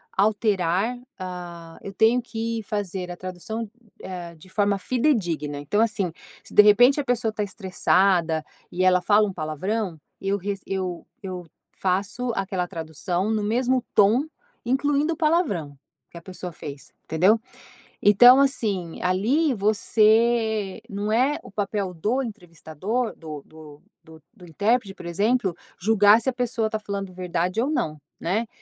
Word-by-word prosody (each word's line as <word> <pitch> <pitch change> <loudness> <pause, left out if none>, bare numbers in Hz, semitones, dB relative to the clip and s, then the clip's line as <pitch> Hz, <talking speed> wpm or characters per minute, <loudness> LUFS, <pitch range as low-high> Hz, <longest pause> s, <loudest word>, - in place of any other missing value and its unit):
alterar, 205 +1 +1 0.2
ah, 175 -3 -8
eu 195 - -7
tenho 225 +5 +4
que 230 -1 -3
fazer 195 -3 -4
a 175 - -5
tradução, 205 +5 -5 0.3
eh, 175 -2 -7
de 160 +3 -17
forma 200 0 +1
fidedigna. 185 - 0
Então, 145 +9 -1
assim, 205 -6 0 0.3
se - - -13
de - - +9
repente 245 +7 +6
a - - 0
pessoa 240 -3 +1
está 215 - -4
estressada 185 -4 +1 0.3
e 180 +1 -1
ela 180 -1 +4
fala 210 +3 +4
um 195 - -5
palavrão, 175 +4 -3 0.2
eu 195 +1 0
re 200 +2 -3
eu 185 -3 -3 0.2
eu 180 -2 -6 0.2
faço 200 +7 -1
aquela 190 -2 -2
tradução 175 +5 -3
no 220 -1 0
mesmo 250 +4 +1
tom, 215 +6 +5 0.4
incluindo 285 +5 +1
o - - -9
palavrão, 305 - 0 0.4
que - - -11
a - - -9
pessoa 180 0 -7
fez 140 -3 -9
entendeu. 185 +8 +3 0.6
Então, 245 +6 +8
assim, 205 - 0
ali 240 - +2
você 220 0 +2
não 205 +1 -3
é 265 +6 +2
o - - -12
papel 200 -2 -2
do 215 +11 0
entrevistador 200 - -4
do 155 -3 -8
do 155 -2 -14 0.2
do 160 -1 -16
do 185 -5 -14
intérprete, 205 +4 0
por - - -11
exemplo, 200 +2 +1 0.2
julgar 210 +1 +5
se 235 - 0
a - - -2
pessoa 245 -2 -1
está 220 0 -3
falando 200 -2 -5
verdade 180 +2 -1
ou 265 - 0
não, 155 - -2 0.2
né. 210 +7 -1
200 Hz, 150 wpm, -24 LUFS, 180-225 Hz, 0.6 s, de